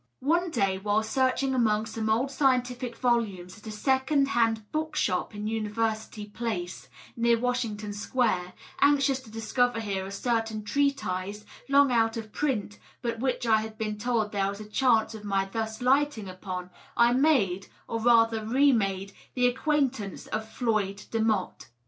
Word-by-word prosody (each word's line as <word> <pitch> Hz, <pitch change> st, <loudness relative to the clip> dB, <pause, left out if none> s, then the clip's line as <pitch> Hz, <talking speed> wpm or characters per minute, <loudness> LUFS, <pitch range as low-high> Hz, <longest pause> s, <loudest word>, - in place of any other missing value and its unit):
One 340 Hz, +6 st, +2 dB
day, 195 Hz, -9 st, 0 dB
while 210 Hz, +2 st, +1 dB
searching 260 Hz, +3 st, +1 dB
amongsome 220 Hz, -2 st, 0 dB
old 245 Hz, +5 st, +1 dB
scientific 250 Hz, -3 st, 0 dB
volumes 220 Hz, -6 st, -1 dB
at 215 Hz, -, -13 dB
a -, -, -4 dB
second 265 Hz, +5 st, +1 dB
hand 225 Hz, -3 st, +2 dB
book 310 Hz, 0 st, -2 dB
shop 185 Hz, -5 st, 0 dB
in 205 Hz, 0 st, -5 dB
University 220 Hz, -1 st, -2 dB
Race, 190 Hz, -7 st, -4 dB, 0.3 s
near 235 Hz, 0 st, +3 dB
Washington 225 Hz, -4 st, -2 dB
Square, 205 Hz, -4 st, 0 dB, 0.3 s
anxious 275 Hz, -2 st, +3 dB
to 260 Hz, -, -15 dB
discover 230 Hz, +2 st, 0 dB
here 200 Hz, -3 st, -2 dB
a -, -, -8 dB
certain 225 Hz, 0 st, -1 dB
treatise, 210 Hz, -6 st, -1 dB, 0.2 s
long 280 Hz, -1 st, +5 dB
out 225 Hz, -1 st, +2 dB
of 220 Hz, -2 st, -7 dB
print, 225 Hz, -8 st, -2 dB, 0.2 s
but 235 Hz, -1 st, -2 dB
which 255 Hz, -1 st, -1 dB
I 220 Hz, -1 st, +4 dB
had 220 Hz, 0 st, -7 dB
been 215 Hz, -2 st, -3 dB
told 225 Hz, -2 st, 0 dB
there 195 Hz, -1 st, 0 dB
was 200 Hz, +1 st, -6 dB
a 215 Hz, -, -7 dB
chance 225 Hz, 0 st, +2 dB
of 215 Hz, -1 st, -9 dB
my 195 Hz, -1 st, 0 dB
thus 220 Hz, +4 st, -4 dB
lighting 265 Hz, -4 st, +2 dB
upon, 185 Hz, -1 st, -6 dB, 0.3 s
I 235 Hz, 0 st, +5 dB
made, 245 Hz, -, +2 dB, 0.2 s
or 230 Hz, -, -2 dB
rather 225 Hz, -1 st, +4 dB
re 270 Hz, +6 st, +4 dB
made, 195 Hz, -4 st, -1 dB, 0.2 s
the 250 Hz, -1 st, +2 dB
acquaintance 260 Hz, -5 st, 0 dB
of 220 Hz, 0 st, -4 dB
Floyd 215 Hz, -6 st, -1 dB
Demotte. 220 Hz, -4 st, -1 dB
225 Hz, 155 wpm, -27 LUFS, 210-250 Hz, 0.3 s, long